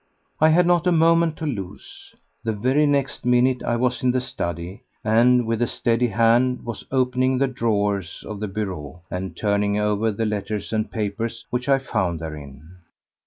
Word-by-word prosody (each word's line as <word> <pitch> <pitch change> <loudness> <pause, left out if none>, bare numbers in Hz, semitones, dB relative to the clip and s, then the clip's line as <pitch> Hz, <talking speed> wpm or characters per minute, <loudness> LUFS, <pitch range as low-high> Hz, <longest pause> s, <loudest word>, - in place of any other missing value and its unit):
I 155 - +6
had 175 +3 +4
not 175 0 +2
a - - +4
moment 165 -1 +3
to 160 - -4
lose. 100 -11 -7 0.3
The 115 -1 -1
very 130 +8 +2
next 140 -1 0
minute 125 +1 +3
I 120 - 0
was 125 +1 0
in 125 - +2
the 130 +1 +2
study 85 -5 -5 0.2
and 120 +3 +4
with 115 0 -1
a 120 - +2
steady 120 +2 +1
hand 115 +3 +2
was 115 -2 -6
opening 130 0 +1
the 135 - +3
drawers 105 -7 -1
of 105 -1 -6
the 105 - -3
bureau 90 -6 -5
and 90 +1 -5
turning 100 -1 +1
over 105 +1 +1
the 110 +2 -2
letters 105 0 -3
and 110 -1 0
papers 115 +2 -3
which 125 +2 -2
I 135 - +5
found 90 -10 -2
therein. 75 +1 -9
115 Hz, 175 wpm, -23 LUFS, 100-130 Hz, 0.3 s, I